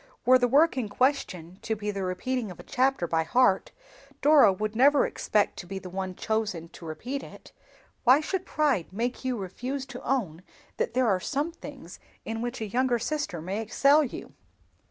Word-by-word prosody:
Were 255 +1 +6
the 245 - +3
work 290 +4 +4
in 230 -5 -2
question 200 - -1
to 220 - -2
be 210 0 -3
the 200 -1 -4
repeating 215 +6 -2
of 180 - -10
a - - -9
chapter 260 -7 +1
by 165 -1 +1
heart, 195 +4 +2 0.5
Dora 285 -8 +6
would 215 +3 -3
never 280 +4 +5
expect 210 -1 0
to 175 - -8
be 195 +1 -5
the 185 -2 -8
one 190 0 -4
chosen 210 -7 -2
to 165 - -11
repeat 245 - -5
it. - - -13 0.5
Why 255 +3 +6
should 370 +4 -2
pride 280 - 0
make 240 +7 -3
you 255 -2 -1
refuse 250 +8 -5
to 255 -2 -9
own 190 -12 -1 0.4
that 470 +2 -2
there 255 -1 +3
are 190 -4 +2
some 290 - -2
things 280 - -11 0.3
in 225 0 -4
which 240 0 -4
a - - -1
younger 245 +3 +1
sister 235 - -3
may 195 +5 -3
excel 280 +7 +4
you?" 260 - -7
235 Hz, 190 wpm, -27 LUFS, 190-270 Hz, 0.5 s, Were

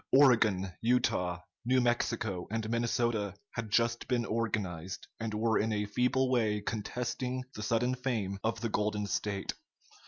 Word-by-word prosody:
Oregon, 110 -9 +5
Utah, 90 -7 +1 0.2
New 130 +2 +3
Mexico, 115 -6 0
and 110 +1 -2
Minnesota 115 -4 0 0.2
had 115 -2 -4
just 115 +2 +1
been 120 -2 +1
organized, 100 -6 -2
and 115 -1 -2
were 110 0 +2
in 110 +1 +1
a 105 -1 0
feeble 125 +5 +1
way 110 -4 +2
contesting 125 +4 -3
the 110 - -6
sudden 115 +4 +1
fame 115 -7 -2
of 115 0 -1
the 115 - 0
Golden 105 -1 0
State. 100 0 -2
115 Hz, 145 wpm, -32 LUFS, 105-120 Hz, 0.2 s, Oregon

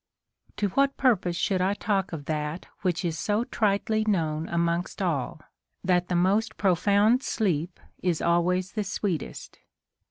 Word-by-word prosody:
To 205 - 0
what 275 +7 +1
purpose 205 -10 +2
should 185 +1 0
I 195 +2 +1
talk 195 -3 -1
of 155 -4 -6
that 150 +2 -3 0.2
which 175 -1 0
is 165 -2 -2
so 210 +2 +1
tritely 215 -1 0
known 160 -6 0
amongst 170 +1 -1
all, 155 -5 -2 0.4
that 180 -1 +2
the 180 - -1
most 190 +5 +2
pro 190 -3 +3
found 205 +7 +3
sleep 180 - -1 0.2
is 175 -3 0
always 180 +2 +1
the 215 - -2
sΛveetest 195 -3 -4
180 Hz, 150 wpm, -27 LUFS, 170-205 Hz, 0.4 s, pro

